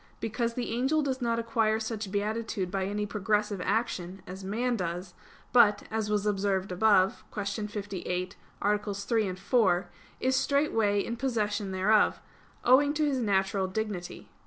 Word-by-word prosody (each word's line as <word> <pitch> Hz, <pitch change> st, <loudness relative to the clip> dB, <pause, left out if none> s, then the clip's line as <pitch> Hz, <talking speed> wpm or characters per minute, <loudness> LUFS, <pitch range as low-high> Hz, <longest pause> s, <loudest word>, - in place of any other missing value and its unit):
Because 230 Hz, +1 st, -2 dB
the 245 Hz, -2 st, -3 dB
angel 265 Hz, +6 st, +1 dB
does 265 Hz, -2 st, -2 dB
not 230 Hz, -1 st, +1 dB
acquire 225 Hz, -1 st, +1 dB
such 220 Hz, -3 st, -4 dB
beatitude 210 Hz, -2 st, -2 dB
by 190 Hz, -1 st, -1 dB
any 205 Hz, +1 st, -2 dB
progressive 210 Hz, -1 st, 0 dB
action, 195 Hz, -5 st, -2 dB
as 190 Hz, +1 st, -8 dB
man 235 Hz, +6 st, 0 dB
does, 180 Hz, -1 st, -4 dB, 0.4 s
but, 215 Hz, -4 st, +6 dB
as 220 Hz, -1 st, -1 dB
was 210 Hz, -1 st, 0 dB
observed 195 Hz, -2 st, 0 dB
above 195 Hz, +2 st, +3 dB
(Q. 205 Hz, 0 st, -3 dB
58, 190 Hz, -3 st, -4 dB, 0.3 s
AA. 205 Hz, +1 st, +3 dB
3, 205 Hz, -1 st, -1 dB
4), 190 Hz, -3 st, +2 dB, 0.3 s
is 260 Hz, +1 st, +1 dB
straightway 225 Hz, -8 st, +2 dB
in 235 Hz, -, -4 dB
possession 210 Hz, -5 st, -1 dB
thereof, 205 Hz, +3 st, +3 dB, 0.5 s
owing 285 Hz, +4 st, +5 dB
to 305 Hz, 0 st, +2 dB
his 275 Hz, -3 st, 0 dB
natural 195 Hz, -3 st, +1 dB
dignity. 190 Hz, -2 st, -5 dB
210 Hz, 145 wpm, -29 LUFS, 195-230 Hz, 0.5 s, but